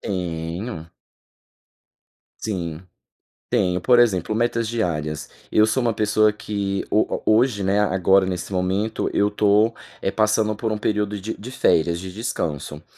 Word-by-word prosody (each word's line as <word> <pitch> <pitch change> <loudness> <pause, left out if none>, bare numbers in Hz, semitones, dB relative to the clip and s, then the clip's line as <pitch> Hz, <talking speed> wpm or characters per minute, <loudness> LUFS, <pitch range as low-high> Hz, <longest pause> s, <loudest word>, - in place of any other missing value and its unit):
Tenho. 85 0 -4 1.5
Sim. 85 -7 -3 0.7
Tenho. 95 -7 +1
Por 120 +6 +4
exemplo, 110 -4 +2
metas 115 0 0
diárias. 80 -9 -2 0.2
Eu 110 - +5
sou 130 +4 0
uma 120 -1 +1
pessoa 105 0 +3
que 100 -2 -3
ho 110 - +3
ho - - -11
hoje, 110 -1 +3
né, 100 +2 +2
agora 95 -1 +3
nesse 90 +1 -4
momento, 95 +4 -1
eu 105 0 +2
tô, 105 +2 +3 0.3
eh, - - 0
passando 110 0 +1
por 110 -1 -2
um 105 - -2
período 105 -1 -1
de 110 +4 -4
de 120 +5 -8
férias, 85 -9 +2
de 95 0 -7
descanso. 80 - -4
105 Hz, 145 wpm, -22 LUFS, 90-110 Hz, 1.5 s, Eu